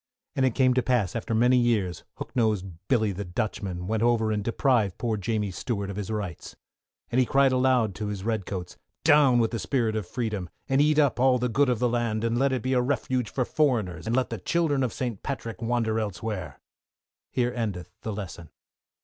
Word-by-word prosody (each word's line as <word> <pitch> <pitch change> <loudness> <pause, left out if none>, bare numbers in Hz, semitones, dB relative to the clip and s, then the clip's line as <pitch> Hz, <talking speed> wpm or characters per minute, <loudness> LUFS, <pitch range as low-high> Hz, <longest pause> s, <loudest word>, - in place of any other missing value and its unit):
And 135 -2 +3
it 125 - -2
came 130 -2 +4
to 130 - +2
pass, 120 -7 0
after 115 0 -2
many 125 +3 +4
years, 105 -8 +1
Hooknosed 110 -6 0 0.2
Billy 110 -5 +2
the 100 +2 -4
Dutchman, 90 -1 -3
went 110 +3 -1
over 115 -2 +2
and 105 -1 -1
deprived 115 -4 +1
poor 115 -2 -1
Jamie 105 -1 -1
Stuart 100 +1 -3
of - - -7
his 105 -1 -4
rights. 100 -5 -5 0.6
And 125 - +2
he 130 - +4
cried 135 -1 +4
aloud 125 -5 +2
to 105 +2 -4
his 100 -2 -4
redcoats, 100 -5 -3 0.3
Down 145 -5 +6
with 115 -2 +2
the 115 - -2
Spirit 115 +1 0
of 105 -4 -3
Freedom! 110 -7 -3 0.2
and 135 0 +3
eat 150 0 +3
up 145 -5 +3
all 130 0 +5
the 125 0 -1
good 135 +4 +3
of 125 - +2
the 125 - +2
land, 115 -2 -1
and 115 +1 +1
let 135 0 +3
it 130 -4 -1
be 130 - 0
a 125 - +3
refuge 125 -2 -1
for 125 - -1
foreigners, 110 - 0
and 115 - +1
let 130 -2 +1
the 115 - -3
children 145 - +1
of 125 -3 0
St. 120 -6 -4
Patrick 115 -5 -5
wander 115 -1 0
elsewhere. 105 -2 -4 0.7
Here 125 -1 0
endeth 100 -7 -3
the 110 - -4
Lesson. 90 -6 -7
115 Hz, 205 wpm, -26 LUFS, 105-125 Hz, 0.7 s, Down